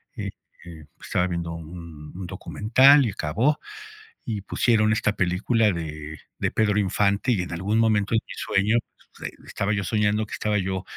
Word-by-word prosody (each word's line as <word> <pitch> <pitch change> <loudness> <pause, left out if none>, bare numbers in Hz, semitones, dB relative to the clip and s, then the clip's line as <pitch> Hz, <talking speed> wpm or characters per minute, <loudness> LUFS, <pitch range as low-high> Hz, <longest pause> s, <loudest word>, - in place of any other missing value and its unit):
eh, - - -4 0.6
pues, - - -13
estaba 90 - +1
viendo 85 -1 -3
un 80 -2 -9
un 95 - -5
documental 130 +10 +4
y 110 - -1
acabó, 110 - 0 0.7
y 105 -4 -3
pusieron 110 +2 +2
esta 110 -2 +1
película 105 +4 +2
de 75 -2 -6 0.2
de - - 0
Pedro 105 -1 +2
Infante, 100 +4 +1
y 95 - 0
en 85 - -8
algún 100 +6 -1
momento 110 -1 +2
en 110 - +2
mi - - -7
sueño, 105 +4 +1 0.4
pues, - - -5
ahí - - -22
estaba 100 +1 -2
yo 100 -1 -1
soñando, 105 +2 +1
que - - -11
estaba 105 -1 0
yo 95 0 -2
100 Hz, 175 wpm, -24 LUFS, 90-110 Hz, 0.7 s, documental